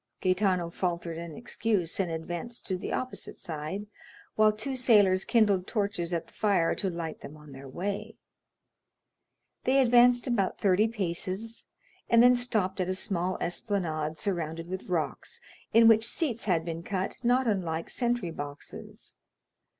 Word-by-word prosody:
Gaetano 185 -2 +1
faltered 170 -2 -2
an 170 -2 -7
excuse, 210 -8 -1
and 190 -3 +1
advanced 175 +8 -5
to 190 - -1
the 180 - -5
opposite 255 0 -4
side, 160 +6 -5 0.5
while 215 0 +5
two 220 +6 -4
sailors 205 -7 +4
kindled 205 -5 +3
torches 200 -5 -1
at 170 -2 -1
the - - -23
fire 195 -6 +2
to 195 - -2
light 165 -2 -5
them 150 - -10
on 150 -1 -14
their 135 0 -10
way. 205 +8 -4 1.5
They 265 +1 +3
advanced 245 -1 +5
about 230 -7 0
thirty 200 +2 +3
paces, 200 +1 -3 0.4
and 235 0 +6
then 250 0 +7
stopped 215 -6 -1
at 185 - -1
a 185 - 0
small 185 -2 0
esplanade 160 -5 -2
surrounded 165 -3 -3
with 185 +1 -6
rocks, 170 -4 -2 0.3
in 230 0 +7
which 225 0 +6
seats 245 -9 -2
had 170 -5 +1
been 165 -1 -4
cut, 190 +1 -3
not 250 +2 +3
unlike 170 -6 -1
sentry 240 -8 -1
boxes. 145 -2 -8
190 Hz, 150 wpm, -29 LUFS, 170-225 Hz, 1.5 s, then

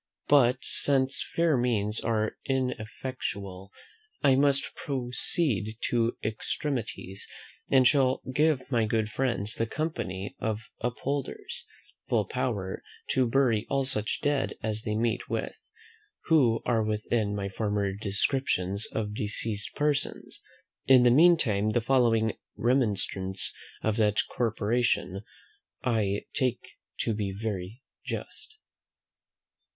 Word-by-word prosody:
But, 130 -3 +5
since 135 -1 +1
fair 165 -3 +1
means 115 -4 +1
are 110 -1 0
ineffectual, 110 -6 -3 0.5
I 140 -2 +6
must 140 0 +2
proceed 125 - 0
to 115 -1 +1
extremities, 110 -3 -3 0.4
and 130 -2 +6
shall 130 -2 +3
give 150 -2 +3
my 115 -3 +3
good 110 0 0
friends, 115 -5 -1
the 115 - -1
Company 110 - -3
of 110 -1 -2 0.2
Upholders, 135 +4 -3 0.4
full - - +2
power 100 -6 -2 0.3
to 130 -2 +3
bury 115 -4 +2
all 135 -1 +1
such 110 -5 -1
dead 145 -2 +1
as 110 0 -1
they 105 -1 -2
meet 115 +1 -1
with, - - -3 0.6
who 130 -9 +3
are 115 -2 +2
within 105 0 0
my 100 -1 -2
former 100 -1 -1
descriptions 100 -1 0
of 105 -2 -3
deceased 105 0 -2
persons. 150 -1 -1 0.5
In 130 -2 +7
the 120 - +6
meantime 130 - +5
the 110 - +2
following 115 -3 +3 0.2
remonstrance 100 -6 +1 0.3
of 110 0 +1
that 105 -1 +2 0.2
corporation 115 -3 0 0.6
I 105 -5 +1
take 130 -4 -1 0.3
to 115 - 0
be 105 -2 -2
very 105 +2 -4 0.2
just. 435 - -7
115 Hz, 115 wpm, -28 LUFS, 105-130 Hz, 0.6 s, In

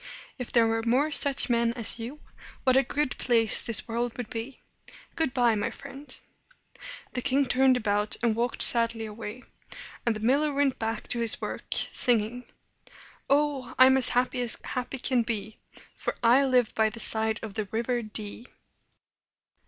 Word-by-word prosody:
If 250 - -6
there 235 -2 +4
were 225 0 0
more 255 +7 +1
such 280 -2 +1
men 235 -1 +1
as 235 -1 +1
you, 250 +7 -8 0.4
what 255 -1 +3
a 265 - +5
good 290 -1 -2
place 230 -3 +2
this 230 -3 -2
world 235 +1 -3
would 245 -3 -7
be! 235 +4 -7 0.6
Good 320 -5 -1
by, 245 -3 +2
my 205 - -2
friend!" 280 +2 -11 1.0
The 250 - -3
king 275 +2 +1
turned 260 0 +3
about, 210 -2 -1
and 230 -2 +1
walked 235 +1 +3
sadly 230 -1 +7
away; 220 +3 -9 0.6
and 235 -2 0
the - - -6
miller 280 +7 +1
went 280 -2 0
back 225 0 -4
to 240 - -2
his 230 -1 +1
work - - -6
singing: 245 0 0 0.8
"Oh, 280 -2 0
I'm 260 +1 +7
as 265 -2 +3
happy 250 +1 0
as 240 -2 -2
happy 250 +2 -5
can 255 -1 0
be, 220 -2 -5 0.4
For - - -4
I 250 +4 +4
live 250 -3 +1
by 220 0 +1
the 215 - -11
side 220 0 -1
of 215 -3 -7
the 215 0 -3
River 235 +4 -2
Dee!" 215 +2 -8
240 Hz, 170 wpm, -26 LUFS, 225-260 Hz, 1.0 s, sadly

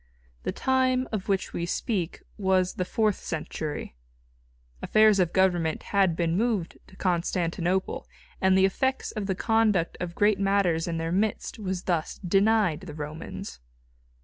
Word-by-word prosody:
The - - -2
time 260 -1 +1
of 210 -2 -4
which 195 -1 0
we 170 - -2
speak 185 -3 -2
was 190 -2 +1
the 180 - -2
fourth 215 +1 +1
century. 155 - -5 0.9
Affairs 215 -2 +5
of 175 -2 +2
government 175 -4 +1
had 190 -4 +3
been 170 0 0
moved 210 -4 -1
to 190 - -17
Constantinople, 175 0 -1 0.3
and 190 0 +4
the 190 - +5
effects 265 +7 0
of 210 -3 -4
the 190 - 0
conduct 215 -5 +1
of 175 -1 -4
great 205 -1 +3
matters 195 -5 +2
in 165 -1 -2
their 165 0 -2
midst 210 +4 -1
was 190 -3 -3
thus 170 -4 -1
denied 200 -3 +3
the 165 -5 -9
Romans. 150 - -7
190 Hz, 150 wpm, -27 LUFS, 170-210 Hz, 0.9 s, Affairs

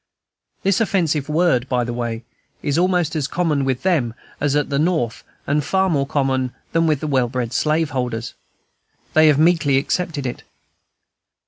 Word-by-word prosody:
This 195 +2 +2
offensive 165 -9 0
word, 150 -6 +2
by 125 -1 +1
the 120 0 -4
way, 120 -1 -3 0.4
is 145 +3 +1
almost 180 -3 +1
as 150 -3 -1
common 155 -6 0
with 130 -2 -1
them 145 -12 +1 0.2
as 145 -1 +1
at 150 0 0
the 140 - +1
North, 155 -8 0 0.2
and 145 +1 +1
far 190 +5 +1
more 140 -3 +1
common 130 -3 0 0.2
than 165 0 +2
with 155 -2 0
well 135 -5 +1
bred 125 -2 -3
slaveholders. 135 -7 -1 0.8
They 155 0 +6
have 150 -2 +5
meekly 155 -3 +3
accepted 150 0 -1
it. 125 - -4
145 Hz, 155 wpm, -20 LUFS, 130-165 Hz, 0.8 s, They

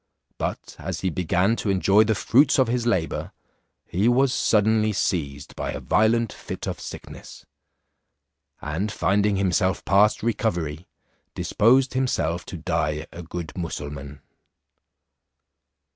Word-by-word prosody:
But - - -4
as - - -4
he 95 - 0
began 90 +6 +1
to 105 - -2
enjoy 100 +3 +4
the 110 0 +1
fruits 140 +8 +4
of 130 -3 +4
his 120 0 -1
labour, 90 -8 -1 0.5
he 95 +6 0
was 125 +2 +3
suddenly 110 0 +2
seized 70 -8 -2
by - - -3
a - - -5
violent 115 +1 +2
fit - - -7
of - - -4
sickness; - - -10 1.2
and 85 +8 -2
finding 100 0 +1
himself 95 0 +1
past 100 +3 +3
recovery, 90 -9 -2 0.5
disposed 130 +5 +3
himself 90 -10 -1
to 90 - -6
die 80 -2 -1
a 85 - -8
good 85 -2 -7
Mussulmaun. 75 -4 -6
95 Hz, 125 wpm, -24 LUFS, 85-110 Hz, 1.2 s, enjoy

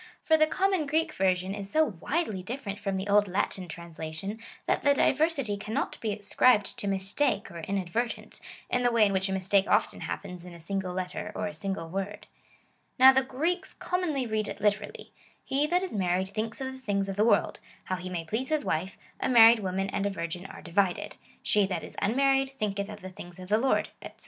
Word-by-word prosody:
For 320 - +4
the 310 0 +4
common 380 -2 +1
Greek 315 +2 +1
version 185 -2 +1
is 200 -1 -5
so 315 +7 +4
widely 220 - -2
different 205 0 -5
from 195 -2 -2
the 190 +2 -4
old 205 0 +4
Latin 185 0 -1
translation, 170 +4 -6 0.3
that - - +1
the 285 -1 +4
diversity 275 -8 +2
cannot 215 +2 -3
be 220 - -1
ascribed 205 +1 +2
to 205 - -2
mistake 195 +5 0
or 170 - -7
inadvertence, 195 +6 -3 0.3
in 250 - 0
the 245 -1 +3
way 230 -2 +5
in 200 - +1
which 190 +1 +1
a - - -2
mistake 190 +1 +2
often - - +2
hap - - -4
pens 180 -1 -8
in 180 -1 -10
a - - -12
single 190 +2 -3
letter 185 +3 -4
or - - -2
a 205 - -4
single 195 -5 -4
word. 195 +4 -4 0.7
Now 265 0 +9
the 265 - +4
Greeks 325 +8 -2
commonly 330 -8 -1
read 215 -2 -1
it - - -6
literally, 210 0 -1 0.2
" - - -35
He 280 +3 +2
that 355 +3 +1
is 375 - -4
married 190 -1 0
thinks 220 +2 -3
of 265 0 -3
the 260 - -10
things 200 -5 -1
of 195 - -3
the 205 - +3
world, 230 - +2 0.2
how 185 - -2
he 180 0 -6
may 170 -2 -4
please 225 +10 -2
his 310 -2 0
wife: 180 +5 -2 0.2
a - - 0
married 230 -2 +8
woman 195 -1 -1
and 200 0 0
a - - 0
virgin 175 0 -5
are - - -11
divided: 180 +1 0 0.3
She 205 -2 +3
that 180 -4 -3
is - - -10
unmarried, 270 +4 +3
thinketh 205 -6 -3
of 210 -1 -9
the 185 - -7
things 175 -1 -11
of 185 0 -10
the 215 +1 +4
Lord," 265 +2 +1
&c. - - -6
205 Hz, 215 wpm, -28 LUFS, 190-260 Hz, 0.7 s, Now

